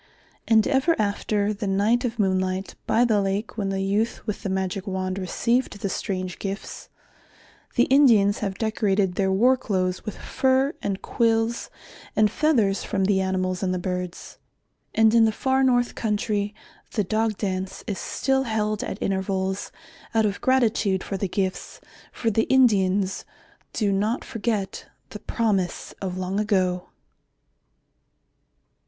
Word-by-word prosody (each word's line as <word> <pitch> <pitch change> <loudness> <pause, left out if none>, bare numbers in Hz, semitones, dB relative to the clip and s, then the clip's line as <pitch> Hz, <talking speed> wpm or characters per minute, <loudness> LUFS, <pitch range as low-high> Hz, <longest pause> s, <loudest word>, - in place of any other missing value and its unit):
And 220 -1 +5
ever 290 +5 +2
after 205 0 0
the 205 0 -4
night 210 +6 +2
of 235 -2 -3
moonlight 185 -2 0
by 240 +2 +4
the 215 -4 +2
lake 195 +3 -2
when 200 -3 -2
the 195 0 -1
youth 210 +4 -1
with 210 - -3
the 195 - -3
magic 190 +1 -2
wand 185 0 -2
received 230 +5 0
the 200 - -2
strange 185 -1 -3
gifts, 200 +1 -6 0.9
the 240 - +5
Indians 230 -8 +5
have 195 -2 -3
decorated 205 -4 +1
their 190 +1 +1
war 240 +7 +4
clothes 185 -7 -1
with 215 - -6
fur 265 +2 +1
and 195 -1 -3
quills 230 0 +1 0.5
and 215 -1 +4
feathers 230 -11 +2
from 195 -3 0
the 190 -1 +2
animals 185 -1 -1
and 185 -1 0
the - - -1
birds. 180 -1 -5 0.6
And 220 0 +5
in 230 -1 +6
the 220 - +3
far 265 +4 +1
north 245 -2 +2
country, 210 -1 -1 0.4
the 210 - +1
Dog 215 +2 0
Dance 190 -2 -3
is 200 - -3
still 270 0 0
held 215 -2 -1
at - - -4
intervals 190 0 -1 0.4
out 220 -1 +4
of 200 -1 -2
gratitude 225 -7 +2
for 195 - -4
the 195 0 -2
gifts, 190 0 -3 0.3
for 225 - -1
the 220 +2 +2
Indians 200 -7 +3 0.5
do 205 -3 0
not 210 +5 0
forget 220 -4 -3 0.2
the - - -7
promise 200 -6 -1
of 185 -2 -3
long 185 +2 -2
ago. 185 -4 0
205 Hz, 150 wpm, -24 LUFS, 190-225 Hz, 0.9 s, in